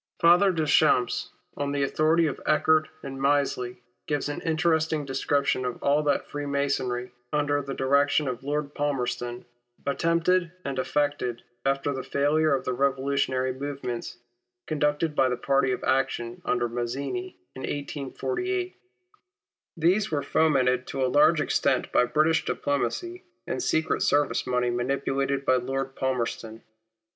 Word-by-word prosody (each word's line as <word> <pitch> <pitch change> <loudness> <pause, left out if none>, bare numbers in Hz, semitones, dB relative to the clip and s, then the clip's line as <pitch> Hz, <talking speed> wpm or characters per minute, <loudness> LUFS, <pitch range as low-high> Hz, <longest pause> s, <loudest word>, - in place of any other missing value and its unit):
Father 175 +4 +6
Deschamps, 145 -6 +2 0.3
on 140 0 -2
the 140 -1 0
authority 155 +4 +2
of 145 - -3
Eckert 155 0 +3 0.2
and 135 -1 -6
Mislay, 140 -3 +1 0.3
gives 145 -1 -1
an 145 - -4
interesting 160 -2 +1
description 135 0 0
of 125 -1 -4
all 145 +2 +3
that 145 -2 0
Freemasonry, 140 -4 -2 0.2
under 145 -1 +1
the 135 -1 -5
direction 140 +2 +2
of 125 0 -4
Lord 145 +1 -2
Palmerston, 125 -4 -2 0.4
attempted 170 +4 +1
and 135 -2 -2
effected 145 -4 -1 0.2
after 135 +1 0
the 130 - -3
failure 145 +3 +2
of 135 - -4
the 130 - -1
revolutionary 135 -1 0
movements, 130 -3 -5 0.5
conducted 150 +1 0
by 130 -2 +3
the 125 - -1
party 135 0 +2
of 125 - -3
action, 130 -3 0
under 120 -1 +1
Mazzini, 135 +10 -4 0.2
in 130 - -7
1848. 145 - -3 1.0
These 180 +6 +2
were 145 -3 -1
fomented 130 -5 +2
to 135 -1 -1
a 125 - -1
large 155 +2 +5
extent 140 -3 +1
by - - +4
British 155 +6 +2
diplomacy 350 - -2 0.2
and - - -3
secret 160 - 0
service 145 0 +2
money 125 -1 +1
manipulated 135 +2 -1
by 130 - +4
Lord 135 +2 -3
Palmerston. 115 -3 -3
140 Hz, 135 wpm, -26 LUFS, 130-150 Hz, 1.0 s, Father